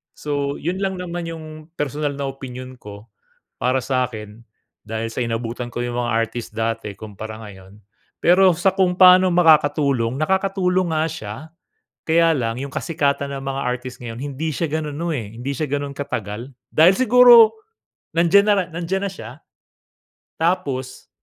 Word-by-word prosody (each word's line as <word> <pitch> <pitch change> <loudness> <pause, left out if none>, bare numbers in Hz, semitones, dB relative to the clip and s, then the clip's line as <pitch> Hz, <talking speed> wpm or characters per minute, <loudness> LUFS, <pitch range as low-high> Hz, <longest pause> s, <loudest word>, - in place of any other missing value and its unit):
So, 145 -1 -2
yun 180 +4 -3
lang 195 -1 -1
naman 175 -2 -5
yung 165 -1 -7 0.3
personal 145 0 -2
na 140 0 -3
opinyon 130 -1 -9
ko. 105 +1 -12 0.5
Para 130 +1 +1
sa'kin, 115 -4 -3 0.4
dahil 110 +1 -4
sa 125 - -2
inabutan 115 +1 -4
ko 120 - -5
yung 120 0 -4
mga 120 0 -1
artist 115 +1 -2
dati 115 -1 -2
kumpara 110 +2 -8
ngayon. 95 -1 -13 0.4
Pero 185 +2 +5
sa 190 +2 +2
kung 185 -2 +1
pa'no 185 0 +7
makakatulong? 145 -7 +3
Nakakatulong 185 +1 +1
nga 155 0 +1
siya 110 -10 -6 0.7
kaya 165 0 +4
lang 115 -3 -2
yung 135 0 -6
kasikatan 140 -3 -1
ng 135 -1 -5
mga 135 0 -3
artist 125 0 -4
ngayon 115 -1 -7
hindi 145 +3 -3
siya 165 +3 -2
ganun 150 -2 -3
no, 170 +2 -2
eh, 110 -6 -5
hindi 135 +3 -3
siya 150 +2 -3
ganun 145 -1 -2
katagal. 115 -3 -5 0.2
Dahil 170 +5 +5
siguro, 245 -2 +7 0.6
nandiyan 175 +4 +5
na 210 - +5 0.2
nandiyan 175 +4 -3
na - - -6
siya 190 - -9 1.1
tapos 135 -7 -2
140 Hz, 155 wpm, -21 LUFS, 120-170 Hz, 1.1 s, pa'no